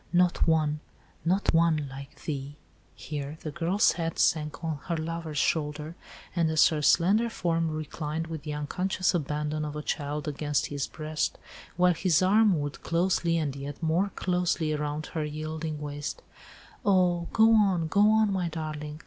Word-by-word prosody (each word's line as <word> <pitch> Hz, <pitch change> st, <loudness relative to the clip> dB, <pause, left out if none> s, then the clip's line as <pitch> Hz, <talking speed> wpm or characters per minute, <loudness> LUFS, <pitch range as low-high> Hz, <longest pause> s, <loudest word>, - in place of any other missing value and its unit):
not 180 Hz, -1 st, +3 dB
one, 155 Hz, -2 st, +2 dB, 0.4 s
not 185 Hz, +5 st, +1 dB
one 165 Hz, -3 st, +3 dB
like 135 Hz, +1 st, -10 dB
thee!'" 140 Hz, -1 st, -4 dB, 0.4 s
Here 145 Hz, 0 st, -5 dB
the 155 Hz, -, -5 dB
girl's 170 Hz, +5 st, +2 dB
head 165 Hz, -1 st, -3 dB
sank 150 Hz, 0 st, +1 dB
on 160 Hz, -3 st, -2 dB
her 170 Hz, -2 st, -1 dB
lover's 160 Hz, -1 st, -4 dB
shoulder, 150 Hz, +1 st, 0 dB, 0.4 s
and 165 Hz, -2 st, +2 dB
as 160 Hz, -1 st, +5 dB
her 155 Hz, -2 st, -2 dB
slender 200 Hz, +10 st, +4 dB
form 165 Hz, -6 st, 0 dB
reclined 155 Hz, +1 st, -4 dB
with 165 Hz, -2 st, -6 dB
the 150 Hz, +1 st, -5 dB
unconscious 180 Hz, +5 st, 0 dB
abandon 150 Hz, -1 st, -1 dB
of 150 Hz, -1 st, -4 dB
a 150 Hz, -, -4 dB
child 150 Hz, -1 st, -3 dB
against 145 Hz, 0 st, 0 dB
his 140 Hz, -1 st, -2 dB
breast, 155 Hz, 0 st, -3 dB, 0.4 s
while 180 Hz, 0 st, +5 dB
his 165 Hz, 0 st, +2 dB
arm 200 Hz, -2 st, +4 dB
wound 145 Hz, 0 st, -4 dB
closely 170 Hz, 0 st, +1 dB
and 145 Hz, -4 st, -1 dB
yet 140 Hz, +3 st, -7 dB
more 170 Hz, +5 st, +2 dB
closely 180 Hz, -3 st, 0 dB
around 150 Hz, 0 st, -2 dB
her 160 Hz, -3 st, -3 dB
yielding 155 Hz, +1 st, -4 dB
waist, 145 Hz, 0 st, -5 dB, 0.6 s
"Oh! 180 Hz, -4 st, +3 dB
go 225 Hz, 0 st, +5 dB
on, 195 Hz, -6 st, +3 dB
go 200 Hz, +6 st, +2 dB
on, 215 Hz, -2 st, +3 dB
my 180 Hz, -3 st, -1 dB
darling! 155 Hz, -1 st, -5 dB
160 Hz, 160 wpm, -28 LUFS, 150-175 Hz, 0.6 s, as